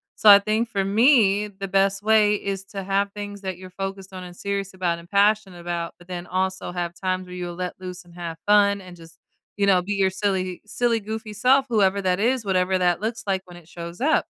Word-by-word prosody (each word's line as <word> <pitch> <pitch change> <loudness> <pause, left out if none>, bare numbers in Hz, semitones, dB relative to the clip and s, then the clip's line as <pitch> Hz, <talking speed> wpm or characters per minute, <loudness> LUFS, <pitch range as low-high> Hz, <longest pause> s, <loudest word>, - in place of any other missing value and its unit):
So - - 0
I 200 -1 +11
think 215 +3 0
for 200 -4 -1
me, 210 -1 +4
the 195 0 -7
best 195 +1 +2
way 210 -1 +4
is 195 -1 -4
to 195 -1 -7
have 195 +1 0
things 205 -1 -7
that 190 -2 -4
you're 185 0 -11
focused 195 0 -6
on 185 -1 -7
and 175 -1 -10
serious 200 0 -3
about 180 -2 -1
and 170 0 -15
passionate 200 -2 +2
about, 170 -1 -4
but 175 - -17
then 180 -1 -6
also 185 +1 -2
have 175 -1 -3
times 185 0 -2
where 180 - -9
you'll 175 -1 -5
let 180 0 -4
loose 180 -1 -8
and 175 - -18
have 170 -2 -6
fun 200 -1 +4
and 180 -1 -12
just, 165 0 -15 0.4
you 200 - +2
know, 185 -2 +5
be 205 +3 -2
your 195 -1 +2
silly 190 -2 -2
silly 230 +2 0
goofy 220 +1 -6
self, 265 +5 +3
whoever 200 -3 +2
that 185 -1 +1
is, 245 +3 +1
whatever 185 -1 +1
that 175 0 +1
looks 225 +1 -3
like 190 -1 0
when 175 -1 -13
it 170 -2 -16
shows 170 +3 -9
up. 310 +4 +2
195 Hz, 230 wpm, -23 LUFS, 180-205 Hz, 0.4 s, I